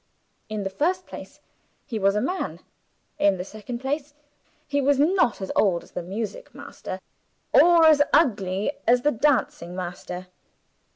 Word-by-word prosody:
In 215 -1 -3
the 195 - -3
first 360 - 0
place, - - -11 0.5
he 230 -6 -4
was 195 0 +2
a 210 - +1
man. 365 +8 -3 0.6
In 200 -1 +3
the 180 - -5
second 215 +4 -7
place, 285 +3 -4 0.5
he 285 0 0
was 280 0 +3
not 295 - +2
as 190 - -4
old 180 -5 +2
as - - -19
the 180 - -4
music 215 - -6
master, - - -8 0.5
or 340 -1 +7
as 310 -2 +6
ugly 200 - +2 0.2
as 245 +1 +4
the 295 - +3
dancing 240 - 0
master. 180 0 -6
235 Hz, 155 wpm, -24 LUFS, 195-295 Hz, 0.6 s, or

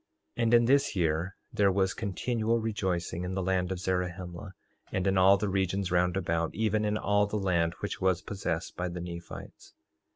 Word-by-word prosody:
3:31 120 - 0
And 115 0 +2
in 120 0 +5
this 140 -1 +3
year 85 +1 0 0.2
there 100 -1 +3
was 95 0 +1
continual 115 +2 -1
rejoicing 95 -6 -2
in 90 +1 -3
the 95 - -1
land 90 0 0
of 95 - -2
Zarahemla, 90 0 -3 0.4
and 95 - -1
in 95 0 +2
all 95 +1 +6
the 105 +1 -1
regions 95 -1 0
round 90 +1 +2
about, 85 -3 -1
even 110 0 +1
in 105 0 +1
all 100 0 +2
the 105 - -2
land 85 -4 +1
which 100 - -4
was 95 -2 +2
possessed 95 -5 -3
by 90 - -2
the 90 +1 -5
Nephites. 85 0 -9
95 Hz, 190 wpm, -29 LUFS, 90-105 Hz, 0.4 s, all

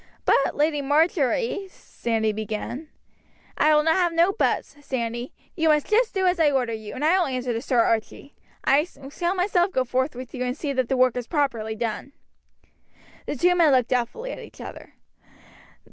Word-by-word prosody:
"But, 275 - +3
Lady 295 0 +1
Marjory 320 - +1
" - - -24
Sandy 220 -2 -2
began. 220 +7 -5 0.7
"I 305 0 +4
will 300 0 +3
have 345 +2 +3
no 340 +4 +3
buts, 390 - -1
Sandy; 240 -2 -3 0.2
you 325 -2 +1
must 300 -1 +3
just 450 +1 +1
do 380 -1 +1
as 360 -1 +2
I 315 -2 +5
order 255 -4 0
you, 220 -1 -7
and 290 - -2
I 360 +4 +4
will 355 - +1
answer 255 -2 -2
to 230 - -3
Sir 255 -2 +1
Archie. 230 +5 -1 0.3
I 285 +2 +4 0.3
shall 350 +4 -1
myself 360 0 +1
go 260 -7 0
forth 260 +3 -1
with 255 0 -8
you 250 - -3
and 250 +2 -2
see 290 -3 -3
that 260 -2 -1
the 265 - +1
work 255 -1 +3
is 245 -1 -4
properly 235 -8 -1
done." 230 +4 -4 1.1
The - - -2
two 355 +6 +3
men 335 -4 +4
looked 255 -3 +3
doubtfully 255 - -2
at - - -7
each - - -13
other. - - -10
275 Hz, 190 wpm, -24 LUFS, 245-335 Hz, 1.1 s, I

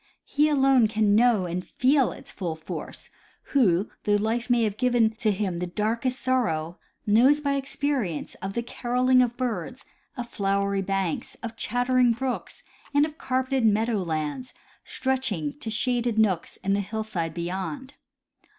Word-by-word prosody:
He 300 +1 +2
alone 270 -5 +4
can 215 -1 +2
know 225 -3 +4
and 180 +1 -3
feel 265 +5 +2
its - - -10
full 170 -5 -4
force 160 - -8 0.4
who, 200 -8 +3
though 205 - +3
life 225 +4 -1
may 240 -1 +3
have 210 -2 0
given 240 -3 +3
to 230 -2 +1
him 190 -3 -2
the 180 - -2
darkest 225 +7 -1
sorrow, 180 -11 0 0.3
knows 245 +8 +5
by 285 -1 0
experience 275 - -2
of 195 +1 -4
the 235 - -2
caroling 250 +2 +2
of 240 -1 0
birds, 245 -1 -3 0.3
of 245 -1 -4
flowery 200 -1 0
banks, 195 -3 -2
of 230 -1 -5
chattering 245 +2 +2
brooks, 255 +2 -4 0.3
and 290 +1 +5
of 310 0 -9
carpeted 260 0 0
meadow 220 +1 +2
lands 160 - -3 0.3
stretch 265 0 -1
iijg 150 -7 -4
to - - -4
shaded 240 0 0
nooks 195 -6 +1
in 195 - +1
the 200 - +1
hillside 200 -5 -3
beyond. 190 +11 -4
225 Hz, 155 wpm, -26 LUFS, 195-255 Hz, 0.4 s, knows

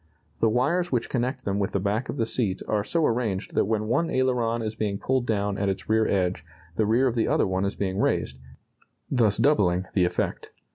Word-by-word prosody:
The 115 - +3
wires 150 +10 +1
which 125 -3 0
connect 130 +1 -2
them 100 0 -1
with 100 - -1
the 100 - +1
back 105 +5 -1
of - - -4
the 115 - +1
seat 110 -5 -1
are 105 -1 0
so 165 +7 0
arranged 115 -6 -1
that - - +2
when 110 0 -1
one 140 +10 +1
aileron 120 -3 0
is 110 0 -3
being 105 -2 -2
pulled 130 +2 -1
down 100 -2 -1
at 100 0 +1
its 95 - -4
rear 110 0 +3
edge 90 -4 0 0.3
the 110 +2 +1
rear 120 +5 +3
of 125 - +1
the 115 -2 +1
other - - +2
one 95 +1 -1
is 100 - -2
being 95 -1 -2
raised, 70 -8 0 0.7
thus 115 -6 +2
doubling 100 -9 +2
the 90 -3 +3
effect. 90 - -2
110 Hz, 220 wpm, -25 LUFS, 100-125 Hz, 0.7 s, The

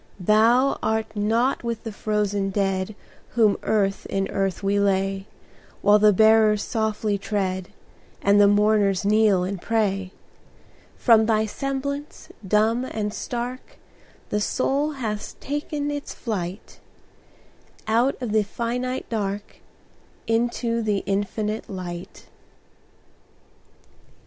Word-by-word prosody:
Thou 225 +7 +3
art 220 0 -1
not 225 +6 +1
with 235 -1 -3
the 225 - -5
frozen 205 -1 -1
dead 195 0 -1 0.4
Whom 220 -4 +3
earth 195 -2 0
in 195 0 -1
the - - -5
earth 195 0 -1
we 200 +1 +2
lay, 195 0 0 0.6
While 205 +1 +6
the 210 0 +6
bearers 215 0 +4
softly 215 -2 -1
tread, 190 -3 -2 0.5
And 200 +1 +4
the 200 - +7
mourners 205 -2 +3
kneel 210 -3 +4
and 185 0 -4
pray; 195 -4 0 0.9
From 220 -3 +5
thy 220 -1 +2
semblance, 275 +5 -4 0.2
dumb 220 +5 +2
and 210 -4 -3
stark, 245 +2 -5 0.5
The 210 - 0
soul 280 +7 0
has 220 -6 -4
taken 290 0 -3
its 290 0 -5
flight 195 -4 -5 1.1
Out 235 +5 +1
of 230 - -2
the 215 0 +3
finite 245 +4 -3
dark, 205 -2 -4 0.7
Into 230 0 0
the 210 -3 0
infinite 210 +2 -2
Light. 180 -2 -7
215 Hz, 115 wpm, -24 LUFS, 200-230 Hz, 1.1 s, the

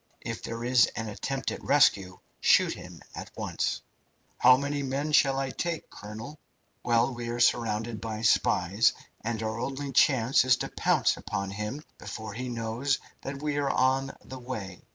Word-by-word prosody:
If - - -5
there 115 0 -5
is 125 -1 +5
an 110 -1 -3
attempt 135 +6 -3
at - - -7
rescue, 100 -10 +3 0.2
shoot - - +4
him - - -11
at - - -7
once." - - -2 0.6
"How 130 - +7
many 140 +1 -2
men 140 +3 -2
shall 135 -2 +4
I 135 -1 -1
take, 170 +1 -4
colonel?" 110 +8 -9 0.4
"Well, 120 +2 +2
we 120 -1 -5
are 120 0 -3
surrounded 115 -2 +1
by 110 0 -5
spies, 100 0 +3 0.3
and 115 0 -2
our 110 +1 -3
only 135 +2 -3
chance 130 -1 +4
is 130 -1 +5
to - - -4
pounce - - +2
upon 95 0 -4
him 105 +9 -5 0.2
before 105 +1 -7
he 125 +4 -4
knows 120 +4 -1 0.2
that 135 +1 -6
we 150 -1 -1
are 140 -1 +1
on 135 +1 +1
the 130 - -8
way. 110 -8 -6
120 Hz, 170 wpm, -28 LUFS, 110-135 Hz, 0.6 s, How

